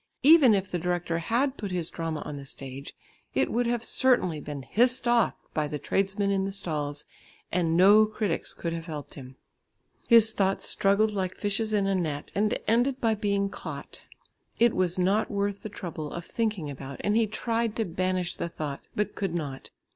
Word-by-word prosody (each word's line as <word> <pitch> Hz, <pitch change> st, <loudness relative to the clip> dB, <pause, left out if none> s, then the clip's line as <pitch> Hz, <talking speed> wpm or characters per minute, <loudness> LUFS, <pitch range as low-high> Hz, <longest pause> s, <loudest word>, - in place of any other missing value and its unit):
Even 285 Hz, -6 st, +7 dB
if 195 Hz, -1 st, -1 dB
the 175 Hz, -, -1 dB
director 175 Hz, -1 st, -1 dB
had 255 Hz, +10 st, 0 dB
put 205 Hz, -, -4 dB
his 175 Hz, -3 st, -2 dB
drama 165 Hz, -2 st, -4 dB
on 150 Hz, -, -6 dB
the 140 Hz, -1 st, -8 dB
stage, 135 Hz, 0 st, -7 dB, 0.4 s
it -, -, +1 dB
would 240 Hz, +1 st, +1 dB
have 235 Hz, -1 st, -1 dB
certainly 240 Hz, -, +2 dB
been 145 Hz, -2 st, -6 dB
hissed 245 Hz, -, +2 dB
off 240 Hz, -3 st, +3 dB, 0.2 s
by 150 Hz, -1 st, 0 dB
the 150 Hz, -, -4 dB
tradesmen 195 Hz, +6 st, 0 dB
in 195 Hz, -1 st, +1 dB
the 195 Hz, -, -2 dB
stalls, 150 Hz, -6 st, -2 dB, 0.5 s
and 165 Hz, -2 st, +1 dB
no 205 Hz, +4 st, +7 dB
critics 210 Hz, -5 st, -2 dB
could 170 Hz, -1 st, -4 dB
have 165 Hz, 0 st, -6 dB
helped 150 Hz, -3 st, -6 dB
him! 130 Hz, -2 st, -10 dB, 0.7 s
His 225 Hz, -2 st, +6 dB
thoughts 195 Hz, -1 st, 0 dB
struggled 200 Hz, +2 st, +3 dB
like 190 Hz, -3 st, -2 dB
fishes 215 Hz, +2 st, 0 dB
in 205 Hz, -2 st, +2 dB
a 195 Hz, -, +1 dB
net, 155 Hz, -6 st, -2 dB
and 210 Hz, +1 st, +1 dB
ended 245 Hz, +4 st, +2 dB
by 225 Hz, -3 st, +2 dB
being 200 Hz, -1 st, 0 dB
caught. -, -, -8 dB, 0.6 s
It 235 Hz, -1 st, +4 dB
was 185 Hz, -1 st, +1 dB
not 195 Hz, +4 st, +2 dB
worth 200 Hz, 0 st, -2 dB
the 215 Hz, -, -6 dB
trouble 160 Hz, -6 st, -6 dB
of 170 Hz, -1 st, -6 dB
thinking 210 Hz, -9 st, -2 dB
about 135 Hz, -1 st, -8 dB
and 205 Hz, +1 st, +1 dB
he 225 Hz, -1 st, +3 dB
tried 230 Hz, +1 st, -1 dB
to 225 Hz, -, 0 dB
banish 185 Hz, 0 st, -1 dB
the 170 Hz, -, -3 dB
thought, 150 Hz, -4 st, -5 dB
but 210 Hz, 0 st, -1 dB
could 195 Hz, -4 st, -3 dB
not. 140 Hz, -5 st, -5 dB
195 Hz, 190 wpm, -27 LUFS, 165-215 Hz, 0.7 s, Even